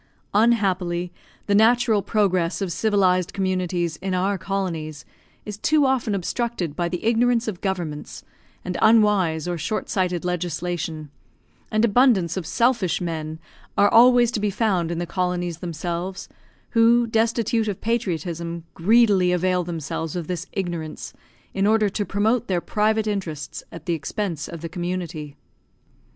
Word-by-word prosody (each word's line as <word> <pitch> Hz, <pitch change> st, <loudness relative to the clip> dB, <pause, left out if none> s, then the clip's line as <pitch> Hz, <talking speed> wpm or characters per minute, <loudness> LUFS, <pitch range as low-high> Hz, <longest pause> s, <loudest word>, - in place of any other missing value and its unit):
Unhappily 185 Hz, -6 st, +1 dB, 0.3 s
the 205 Hz, -, 0 dB
natural 225 Hz, 0 st, +4 dB
progress 190 Hz, -4 st, +1 dB
of 195 Hz, -3 st, -2 dB
civilised 185 Hz, -3 st, +2 dB
communities 180 Hz, -3 st, -1 dB
in 190 Hz, 0 st, -3 dB
our 190 Hz, +2 st, +1 dB
colonies 170 Hz, -6 st, -4 dB, 0.4 s
is 210 Hz, -1 st, -7 dB
too 300 Hz, +2 st, +3 dB
often 255 Hz, -6 st, +1 dB
obstructed 195 Hz, -, -2 dB
by 175 Hz, -1 st, -1 dB
the 180 Hz, 0 st, -4 dB
ignorance 235 Hz, +1 st, +2 dB
of 195 Hz, -5 st, -4 dB
governments, 175 Hz, -6 st, -4 dB, 0.4 s
and 180 Hz, -1 st, -3 dB
unwise 205 Hz, -8 st, +3 dB
or 175 Hz, -1 st, -2 dB
short 215 Hz, +7 st, -3 dB
sighted 180 Hz, -3 st, -1 dB
legislation; 170 Hz, -3 st, -3 dB, 0.6 s
and 215 Hz, +2 st, +2 dB
abundance 220 Hz, -7 st, +3 dB
of 185 Hz, -4 st, -4 dB
selfish 230 Hz, -7 st, +1 dB
men 160 Hz, -2 st, -4 dB, 0.4 s
are 205 Hz, -, +5 dB
always 245 Hz, 0 st, +6 dB
to 230 Hz, -, -2 dB
be 210 Hz, 0 st, 0 dB
found 195 Hz, -5 st, 0 dB
in 170 Hz, -, -3 dB
the 175 Hz, -, -2 dB
colonies 175 Hz, -2 st, -2 dB
themselves, 175 Hz, +2 st, -4 dB, 0.4 s
who, 235 Hz, +1 st, +4 dB
destitute 225 Hz, 0 st, +1 dB
of 200 Hz, -3 st, -3 dB
patriotism, 170 Hz, -6 st, -2 dB
greedily 200 Hz, -1 st, +4 dB
avail 180 Hz, 0 st, +1 dB
themselves 165 Hz, -1 st, -4 dB
of 175 Hz, -2 st, -3 dB
this 180 Hz, +1 st, -4 dB
ignorance, 175 Hz, -5 st, -4 dB, 0.4 s
in 195 Hz, +1 st, +1 dB
order 215 Hz, -1 st, +3 dB
to 205 Hz, +2 st, -2 dB
promote 220 Hz, +4 st, +1 dB
their 185 Hz, -2 st, +1 dB
private 215 Hz, +4 st, +1 dB
interests 185 Hz, -8 st, -4 dB
at 165 Hz, -2 st, -10 dB
the 175 Hz, -, 0 dB
expense 165 Hz, +1 st, -3 dB
of 170 Hz, -2 st, -8 dB
the 165 Hz, -, -4 dB
community. 175 Hz, -4 st, -4 dB
185 Hz, 140 wpm, -23 LUFS, 170-215 Hz, 0.6 s, always